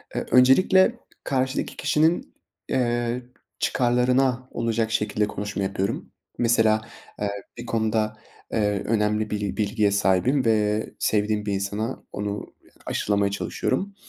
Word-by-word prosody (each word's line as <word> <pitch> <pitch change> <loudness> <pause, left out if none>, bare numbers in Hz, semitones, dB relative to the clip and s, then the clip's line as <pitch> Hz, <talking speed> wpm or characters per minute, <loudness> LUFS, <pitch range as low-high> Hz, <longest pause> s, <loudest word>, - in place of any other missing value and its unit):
Eee, - - -2
öncelikle 185 - +5 0.2
karşıdaki 130 0 -1
kişinin, 155 +3 +1 0.4
eee, 120 -1 0 0.4
çıkarlarına 125 +1 +2
olacak 115 -1 -1
şekilde 105 -1 0
konuşma 100 -1 -4
yapıyorum. 95 0 -2 0.3
Mesela, 110 -2 +3 0.4
eee, 105 - 0 0.3
bir 120 - -7
konuda, 110 -1 0 0.3
eee, 105 -2 0
önemli 105 -1 +1
bil 105 -1 -3
bilgiye 105 -1 +1
sahibim 100 +8 +2
ve 105 -1 +2
sevdiğim 105 0 +1
bir 100 - -1
insana 105 +5 -3
onu 105 0 -4 0.4
aşılamaya 100 -1 0
çalışıyorum. 190 - -2
110 Hz, 110 wpm, -24 LUFS, 105-125 Hz, 0.4 s, öncelikle